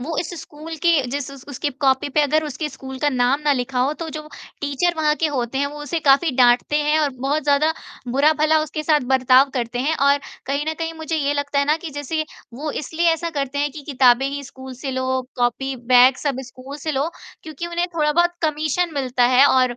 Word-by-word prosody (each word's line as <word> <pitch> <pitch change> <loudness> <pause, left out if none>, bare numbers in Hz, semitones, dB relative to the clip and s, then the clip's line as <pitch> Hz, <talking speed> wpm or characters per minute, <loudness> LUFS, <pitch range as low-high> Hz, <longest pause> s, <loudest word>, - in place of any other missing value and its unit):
वो 310 +6 -4
इस 330 - -2
स्कूल 310 +2 -9
के 340 -1 +4 0.2
जिस 280 0 -3
उस 275 -1 -12
उसके 285 +2 -3
कॉपी 265 +1 +2
पे 300 - +5
अगर 305 +2 +1
उसके 300 +1 -4
स्कूल 265 -2 -9
का 295 - +1
नाम 255 +1 +1
ना 295 -1 +2
लिखा 250 0 -2
हो, 270 +4 +2
तो 325 +1 -6
जो 310 0 -6 0.4
टीचर 290 +5 0
वहाँ 300 -1 +2
के 325 - +1
होते 245 +1 -2
हैं, 280 - +1
वो 295 +1 -7
उसे 330 +3 -2
काफ़ी 285 +3 +4
डाँटते 250 +3 +4
हैं 300 +1 +2
और 295 -2 +1
बहुत 285 +4 0
ज़्यादा 295 +2 +3 0.4
बुरा-भला 305 +4 +3
उसके 310 0 -4
साथ 305 -1 +3
बर्ताव 260 +1 +5
करते 245 -1 -2
हैं 295 +5 +1
और 280 +1 +3 0.3
कहीं 280 +2 -1
न 315 - -1
कहीं, 330 0 -3
मुझे 320 0 -3
ये 290 -1 0
लगता 285 0 -1
है 280 - +3
ना 300 +2 +2
कि 325 -1 -8
जैसे 290 +2 -3 0.3
वो 300 +4 -4
इसलिए 320 +4 -2
ऐसा 335 +1 -3
करते 275 0 -2
हैं 290 0 0
कि 295 0 -9
किताबें 255 0 +4
ही 280 +1 -4
स्कूल 260 0 -10
से 275 - -3
लो, 260 0 -1
कॉपी, 250 +2 0
बैग, 250 +2 +5
सब 275 -3 -2
स्कूल 260 +3 -10
से 310 +1 -3
लो, 280 +3 0 0.3
क्योंकि 315 +2 -6
उन्हें 345 +1 -1
थोड़ा 300 -2 +1
बहुत 345 +2 +2
कमीशन 315 +2 0
मिलता 255 -3 +1
है 275 +2 +8
और 255 -2 +3
285 Hz, 225 wpm, -21 LUFS, 265-310 Hz, 0.4 s, है